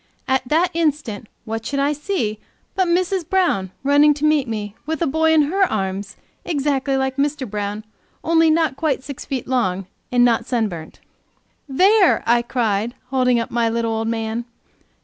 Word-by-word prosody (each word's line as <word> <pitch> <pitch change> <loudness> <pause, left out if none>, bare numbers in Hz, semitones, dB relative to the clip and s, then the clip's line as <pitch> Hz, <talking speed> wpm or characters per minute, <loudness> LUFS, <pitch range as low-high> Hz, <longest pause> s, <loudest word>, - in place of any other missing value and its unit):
At 265 -1 0
that 325 +6 +2
instant 295 -10 -1 0.2
what 225 0 -4
should 280 - -3
I 285 +2 +2
see 295 - -2 0.3
but 375 -2 +1
Mrs. 360 0 0
Brown, 350 - +1
running 290 +1 +5
to 300 +1 -2
meet 305 -3 +3
me 210 -3 -4
with 320 -1 -2
a - - +2
boy 320 +3 +2
in 315 -2 +5
her 365 +8 -1
arms 195 -1 -3 0.3
exactly 275 -3 0
like 265 0 -1
Mr. 285 -1 -1
Brown, 210 +1 -4 0.4
only 330 0 +4
not 315 -3 +2
quite 275 -3 -1
six 280 -1 -8
feet 265 -3 -4
long, 195 -8 0 0.3
and 245 -1 +4
not 230 -1 +1
sunburnt. 205 -10 -3 0.7
"There!" 380 +7 +4
I 235 +1 +4
cried, 235 -1 -1 0.2
holding 250 -2 +2
up 230 - -4
my 235 -1 +1
little 230 0 -1
old 225 0 -2
man. 225 +1 -2
265 Hz, 170 wpm, -20 LUFS, 225-305 Hz, 0.7 s, running